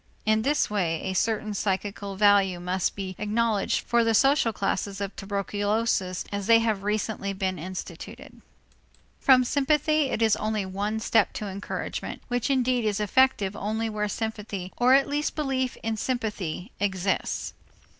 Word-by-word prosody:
In 215 Hz, 0 st, +3 dB
this 290 Hz, +5 st, +2 dB
way 175 Hz, -6 st, -1 dB
a 190 Hz, -, -2 dB
certain 215 Hz, +2 st, 0 dB
psychical 200 Hz, 0 st, -2 dB
value 195 Hz, -3 st, +4 dB
must 180 Hz, +1 st, -1 dB
be 190 Hz, -2 st, -5 dB
acknowledged 210 Hz, 0 st, +1 dB
for 235 Hz, 0 st, +2 dB
the 225 Hz, -1 st, +2 dB
social 270 Hz, -1 st, +4 dB
classes 195 Hz, -1 st, -2 dB
of 200 Hz, -1 st, -4 dB
tuberculosis 205 Hz, -1 st, -1 dB
as 200 Hz, -1 st, -3 dB
they 230 Hz, 0 st, +7 dB
have 220 Hz, -3 st, 0 dB
recently 210 Hz, -1 st, -2 dB
been 190 Hz, -2 st, -2 dB
instituted. 180 Hz, -1 st, -8 dB, 0.8 s
From 255 Hz, -2 st, +6 dB
sympathy 300 Hz, +2 st, +2 dB
it 230 Hz, -, 0 dB
is 220 Hz, -2 st, +4 dB
only 215 Hz, -2 st, -1 dB
one 205 Hz, +3 st, -2 dB
step 220 Hz, -1 st, +2 dB
to 210 Hz, -, -4 dB
encouragement, 200 Hz, 0 st, -5 dB
which 245 Hz, +2 st, -1 dB
indeed 255 Hz, -2 st, +2 dB
is 210 Hz, -1 st, 0 dB
effective 210 Hz, -2 st, +2 dB
only 220 Hz, +2 st, -2 dB
where 210 Hz, 0 st, -1 dB
sympathy 210 Hz, -4 st, -4 dB
or 250 Hz, +2 st, +5 dB
at 275 Hz, -, +3 dB
least 295 Hz, +1 st, -1 dB
belief 265 Hz, -4 st, -1 dB
in 225 Hz, -1 st, -1 dB
sympathy 210 Hz, -6 st, -3 dB
exists. 190 Hz, -1 st, -1 dB
210 Hz, 150 wpm, -26 LUFS, 195-230 Hz, 0.8 s, they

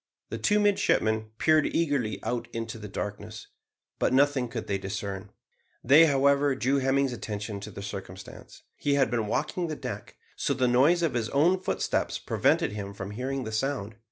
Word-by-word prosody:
The -, -, -5 dB
two 210 Hz, 0 st, +3 dB
midshipmen 110 Hz, -, +2 dB
peered 155 Hz, +1 st, +4 dB
eagerly 135 Hz, -11 st, 0 dB
out 120 Hz, -1 st, -2 dB
into 115 Hz, 0 st, -5 dB
the 105 Hz, -, -7 dB
darkness, 105 Hz, +2 st, -6 dB, 0.5 s
but -, -, +2 dB
nothing 135 Hz, -1 st, +3 dB
could 115 Hz, -1 st, -5 dB
they 100 Hz, -1 st, -1 dB
discern. 95 Hz, 0 st, -5 dB, 0.5 s
They, 150 Hz, +6 st, +7 dB
however, 140 Hz, 0 st, +3 dB
drew 135 Hz, +2 st, +1 dB
Hemming's 135 Hz, 0 st, +1 dB
attention 105 Hz, -2 st, -5 dB
to 100 Hz, -, -8 dB
the 100 Hz, -, -8 dB
circumstance. 95 Hz, -2 st, -9 dB
He 140 Hz, -1 st, +1 dB
had 135 Hz, -2 st, +2 dB
been 115 Hz, -3 st, 0 dB
walking 155 Hz, -, -1 dB
the 155 Hz, -, -3 dB
deck, -, -, -7 dB, 0.2 s
so 140 Hz, -, -1 dB
the 130 Hz, -1 st, +2 dB
noise 145 Hz, +8 st, +4 dB
of 165 Hz, -, +1 dB
his 115 Hz, -2 st, -1 dB
own 170 Hz, +7 st, +3 dB
footsteps 185 Hz, -, -1 dB
prevented -, -, +1 dB
him 100 Hz, -1 st, -6 dB
from 100 Hz, 0 st, -6 dB
hearing 130 Hz, +4 st, -3 dB
the 110 Hz, -, -5 dB
sound. 110 Hz, -2 st, -2 dB
125 Hz, 175 wpm, -27 LUFS, 105-140 Hz, 0.5 s, They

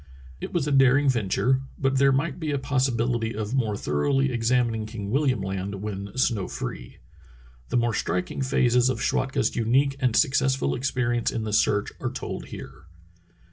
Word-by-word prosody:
It -, -, -6 dB
was 160 Hz, -5 st, -1 dB
a -, -, 0 dB
daring 135 Hz, +1 st, +5 dB
venture, 125 Hz, +3 st, +1 dB, 0.2 s
but 135 Hz, -1 st, +1 dB
there 140 Hz, 0 st, +5 dB
might 145 Hz, +4 st, -1 dB
be 160 Hz, -2 st, -3 dB
a 145 Hz, -, 0 dB
possibility 120 Hz, -4 st, 0 dB
of 110 Hz, +1 st, -4 dB
more 110 Hz, -6 st, 0 dB
thoroughly 135 Hz, -, +1 dB
examining 115 Hz, -2 st, 0 dB
King 105 Hz, -2 st, -6 dB
William 135 Hz, -4 st, +1 dB
Land 95 Hz, +1 st, -3 dB
when 100 Hz, +1 st, -6 dB
snow 115 Hz, -7 st, +1 dB
free. -, -, -6 dB, 0.7 s
The -, -, +1 dB
more 120 Hz, -1 st, +1 dB
striking 90 Hz, +5 st, -2 dB
phases 125 Hz, -1 st, +3 dB
of 130 Hz, -3 st, -2 dB
Schwatka's 135 Hz, +3 st, 0 dB
unique 135 Hz, +5 st, +2 dB
and 125 Hz, -4 st, +1 dB
successful 135 Hz, -, +2 dB
experience 120 Hz, -, 0 dB
in 115 Hz, -, -3 dB
the 105 Hz, -1 st, -4 dB
search 105 Hz, -1 st, +2 dB
are -, -, -2 dB
told -, -, -5 dB
here. 80 Hz, -, -10 dB
125 Hz, 165 wpm, -25 LUFS, 110-135 Hz, 0.7 s, daring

